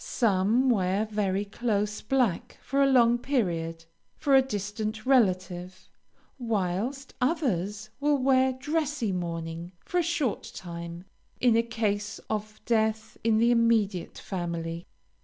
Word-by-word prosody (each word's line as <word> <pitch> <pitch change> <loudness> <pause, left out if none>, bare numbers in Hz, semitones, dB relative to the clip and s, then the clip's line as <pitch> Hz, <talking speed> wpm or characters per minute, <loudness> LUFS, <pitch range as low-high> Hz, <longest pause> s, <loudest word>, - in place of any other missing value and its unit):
Some 225 +3 +2
wear 195 -1 +1
very 205 -2 -1
close 210 -1 -1
black 240 -2 0
for 275 +1 0
a 275 - +5
long 240 -2 +5
period, 165 - -1 0.3
for 280 - +1
a 265 - +8
distant 215 -1 -4
relative; 185 -7 +1 0.5
whilst 230 +4 -2
others 215 - -1
will 290 0 +3
wear 260 0 +3
dressy 295 -3 -1
mourning 170 -1 -4
for 360 - 0
a - - +4
short 320 -8 -1
time 170 0 -7 0.3
in 245 -3 +4
a 230 - +5
case 215 -3 -2
of 215 0 -3
death 220 -1 0
in 225 -1 +3
the 235 +2 +4
immediate 225 -6 +2
family. 170 -2 -4
215 Hz, 125 wpm, -28 LUFS, 185-250 Hz, 0.5 s, a